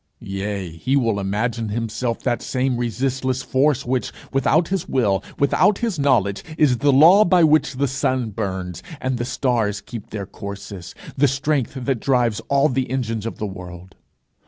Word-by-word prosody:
Yea, 100 -1 -3
he 105 +12 -1
will 115 -7 +1
imagine 110 +3 -2
himself 115 +2 -2
that 120 -2 0
same 130 0 -1
resistless 130 +2 -1
force 135 +1 +1
which, 125 0 -1 0.2
without 155 +5 +2
his 190 -3 -2
will, 105 -7 +1
without 165 +8 +3
his 225 -9 -2
knowledge, 115 -8 +2
is 130 -6 +3
the 145 - +4
law 165 +10 +7
by 180 -3 +4
which 155 -1 +4
the 140 +2 +1
sun 130 -3 -1
burns, 95 -5 -4 0.2
and 130 -1 -2
the - - -1
stars 115 -6 0
keep 115 -4 -9
their 100 -2 -5
courses, 100 -2 -8 0.2
the 145 +2 +4
strength 135 0 -1
that 130 -1 -1
drives 120 -5 +1
all 140 +1 +4
the 130 -2 -1
engines 115 -4 -2
of - - -6
the 105 - -3
world. 90 -1 -9
125 Hz, 165 wpm, -21 LUFS, 105-135 Hz, 0.2 s, law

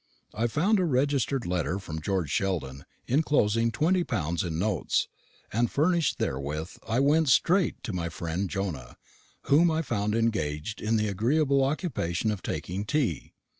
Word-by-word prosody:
I 115 +2 0
found 190 - +2
a - - +2
registered 140 -3 +1
letter 90 +1 -1
from 80 -5 -6
George 90 -3 -1
Sheldon, 80 -9 -2 0.2
enclosing 115 -5 +2
twenty 175 +7 +2
pounds 85 - -1
in 85 -3 -3
notes, 100 -1 0 0.5
and 120 +2 +2
furnished 165 +2 +1
therewith 75 +5 -3
I 115 +3 +1
went 150 +2 +3
straight 180 +9 +3
to 120 -4 -4
my 85 -2 -2
friend 85 +3 -3
Jonah, 85 -12 -4 0.5
whom 165 +5 +4
I 160 0 0
found 105 -5 -1
engaged 105 -5 -1
in 110 +1 +1
the 110 -1 +1
agreeable 135 +7 +2
occupation 120 - -1
of 100 -4 -4
taking 95 +4 -4
tea. 120 - -1
110 Hz, 150 wpm, -27 LUFS, 90-140 Hz, 0.5 s, whom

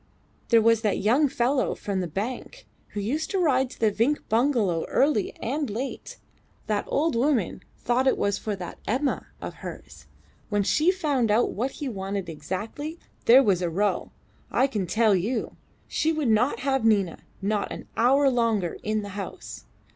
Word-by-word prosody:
There 230 -2 +5
was 230 -1 +4
that 210 -3 +1
young 255 +9 +3
fellow 255 +1 0
from 200 -2 -3
the 180 - -2
bank 210 +10 -5 0.3
who 210 - -3
used 270 +11 -2
to 390 - -1
ride 265 -7 +2
to - - -13
the 220 -2 +3
Vinck 235 +9 0
bungalow 220 - +2
early 270 -7 +2
and 280 +3 -2
late. 245 +6 -5 0.5
That 210 -1 -1
old 310 -1 +1
woman 245 - +1 0.2
thought 250 +2 +1
it - - +3
was 200 0 0
for 210 -2 -3
that 180 -3 -8
Emma 265 +5 0 0.2
of - - -5
hers. - - -9 0.4
When 205 -2 +1
she 305 - +3
found 290 - +1
out 220 +3 +3
what 250 +6 -2
he 290 - -5
wanted 195 -4 -4
exactly, 210 - -5 0.3
there 255 +4 +8
was 190 -6 +2
a 175 - 0
row, 200 +5 0 0.4
I - - +3
can 215 -9 -2
tell 220 +2 +3
you. 220 +6 -2 0.3
She 320 - +1
would 310 -6 0
not 225 +5 +2
have 270 -2 +1
Nina 200 -6 +2 0.2
not 205 +1 -1
an - - -7
hour 270 +5 +4
longer 230 -8 +1
in 215 0 -1
the 205 - -6
house. 200 0 -7
230 Hz, 175 wpm, -26 LUFS, 205-270 Hz, 0.5 s, there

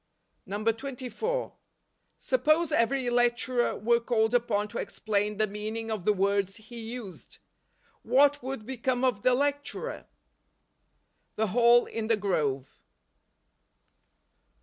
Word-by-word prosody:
24. 250 - -2 0.6
Suppose 335 -8 +2
every 255 +2 +1
lecturer 240 0 +1
were 235 +3 +2
called 230 -1 +1
upon 220 -4 +1
to 205 - -6
explain 210 -1 -2
the 215 - +3
meaning 215 +2 -5
of 210 -5 -4
the 210 - +5
words 200 -1 +1
he 230 +2 -10
used! 225 -4 -8 0.6
What 285 +2 +3
would 260 -3 -5
become 255 0 -2
of 235 -6 0
the 255 +2 +4
lec¬ 285 +2 +1
turer? - - -6 1.3
The 220 -1 0
Hall 240 +3 +5
in 225 -1 -4
the 225 -1 +2
Grove. 145 -10 -2
230 Hz, 115 wpm, -28 LUFS, 210-255 Hz, 1.3 s, the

